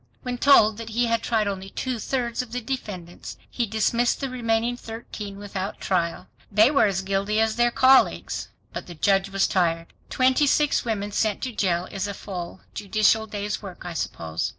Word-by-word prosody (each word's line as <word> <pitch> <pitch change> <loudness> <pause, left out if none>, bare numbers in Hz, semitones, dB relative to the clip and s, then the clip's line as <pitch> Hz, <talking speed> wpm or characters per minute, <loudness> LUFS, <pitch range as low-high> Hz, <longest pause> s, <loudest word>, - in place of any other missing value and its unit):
When 250 -2 -4
told 220 -7 +6
that 230 -1 -7
he 235 +2 +1
had 230 0 +1
tried 220 -3 +1
only 195 -1 -4
two 255 +3 -3
thirds 240 0 -1
of 250 -3 -10
the 250 - -1
defendants, 205 -9 -6
he 240 -2 -1
dismissed 230 +3 +1
the 270 -2 -3
remaining 235 -1 0
thirteen 225 -4 -8
without 200 -1 -5
trial! 170 -3 -1 0.3
They 215 +6 +5
were 280 -7 +4
as 190 -1 -1
guilty 195 +2 0
as 220 -1 +2
their 240 +1 +3
colleagues. 260 +2 +3 0.2
But - - -6
the 175 - -9
judge 195 +4 +2
was 195 0 +2
tired. 165 -2 0 0.2
Twenty 260 +3 +3
six 295 +1 +2
women 210 -4 -2
sent 210 0 0
to 260 - -2
jail 180 -5 0
is 195 0 -3
a 200 - -5
full 180 -2 -7
judicial 215 +2 +2
day's 210 -1 -4
work, 190 -4 -9
I 175 - -5
suppose. 80 - -3
215 Hz, 185 wpm, -24 LUFS, 195-240 Hz, 0.3 s, told